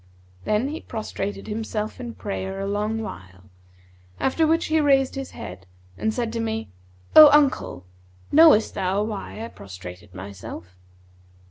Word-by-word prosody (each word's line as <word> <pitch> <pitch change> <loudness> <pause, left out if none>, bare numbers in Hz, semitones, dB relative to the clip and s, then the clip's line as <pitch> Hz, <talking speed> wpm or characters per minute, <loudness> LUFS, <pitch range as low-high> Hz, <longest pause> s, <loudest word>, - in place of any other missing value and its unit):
Then 215 +6 +1
he 310 - -5
prostrated 205 -2 -5
himself 215 0 -4
in 240 -2 -6
prayer 195 -1 -4
a 195 - -2
long 210 +2 -1
while, 95 - -10 0.7
after 315 +4 +2
which 330 +2 +2
he 315 0 +2
raised 270 -2 +3
his 270 -1 -5
head 90 0 -9 0.3
and 220 - -1
said 230 0 -3
to 230 - -2
me, 225 - -3 0.4
'O 305 -1 +12
uncle, 280 - +2 0.5
knowest 310 -8 +6
thou 190 +2 0
why 215 +1 -5
I - - -6
prostrated 90 0 -11
myself?' 95 -1 -9
215 Hz, 140 wpm, -24 LUFS, -, 0.7 s, O